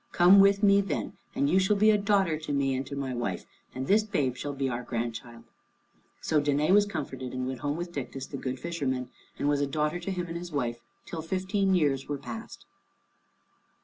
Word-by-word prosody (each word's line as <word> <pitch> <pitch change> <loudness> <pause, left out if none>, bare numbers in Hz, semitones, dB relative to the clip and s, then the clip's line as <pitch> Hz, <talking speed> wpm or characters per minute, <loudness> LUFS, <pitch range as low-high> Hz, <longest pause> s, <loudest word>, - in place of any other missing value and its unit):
Come 180 +3 +7
with 200 +1 +5
me, 200 0 +6
then, 145 - -3 0.2
and 140 - +2
you 185 +6 +4
shall 190 +2 +3
be 215 +2 +5
a 210 - +4
daughter 200 -5 +2
to 155 -1 -6
me 140 -1 +1
and 130 +1 -1
to 140 - -6
my 135 -2 -3
wife, 120 -7 -3 0.3
and 130 +1 -3
this 210 +7 +4
babe 150 - -1
shall 145 +2 -5
be 135 -1 -1
our 125 -1 -2
grandchild." 115 0 -5 0.8
So 155 -2 +2
Danæ 145 +3 +1
was 205 +1 +5
comforted 130 -8 -5
and 130 0 -2
went 130 -1 -4
home 145 +4 -2
with 175 0 -5
Dictys, 135 -3 -5
the 140 - -4
good 130 -1 -4
fisherman, 130 -7 -3 0.3
and 145 - -1
was 145 -1 +2
a 145 - +1
daughter 150 +4 -1
to 175 - -5
him 180 -2 -2
and 165 - -6
to 170 - -4
his 175 0 -8
wife, 120 -5 -2 0.2
till 165 - -5
fifteen 190 +3 0
years 140 -6 +1
were 145 - -1
past. 225 - -8
145 Hz, 215 wpm, -28 LUFS, 130-185 Hz, 0.8 s, Come